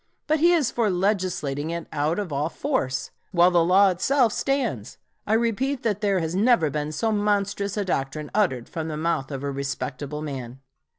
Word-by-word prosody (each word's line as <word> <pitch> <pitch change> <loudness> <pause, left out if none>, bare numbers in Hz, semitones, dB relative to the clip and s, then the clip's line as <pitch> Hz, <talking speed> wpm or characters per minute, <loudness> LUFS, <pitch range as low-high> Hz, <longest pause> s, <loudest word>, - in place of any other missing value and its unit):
But 310 0 +1
he 340 +3 +5
is 310 -8 +2
for 230 -3 +1
legislating 180 -7 -1
it 170 0 -4
out 150 +3 0
of 195 -7 -3
all 145 +3 0
force, 165 - -2 0.2
while 175 -1 +5
the 170 -1 +4
law 190 +3 +5
itself 235 +5 +2
stands. 240 - -2 0.3
I 210 - +2
repeat 235 +4 0
that 210 -3 0
there 200 -2 +2
has 165 -2 -2
never 205 - +3
been 150 +1 -2
so 220 +9 0
monstrous 205 -1 0
a 205 - 0
doctrine 150 -3 -2
uttered 170 - +1
from 160 -1 -5
the 155 -1 -4
mouth 155 -4 -1
of 135 -2 -5
a 140 - -2
respectable 140 +2 -4
man. 130 -4 -6
180 Hz, 185 wpm, -24 LUFS, 145-210 Hz, 0.3 s, he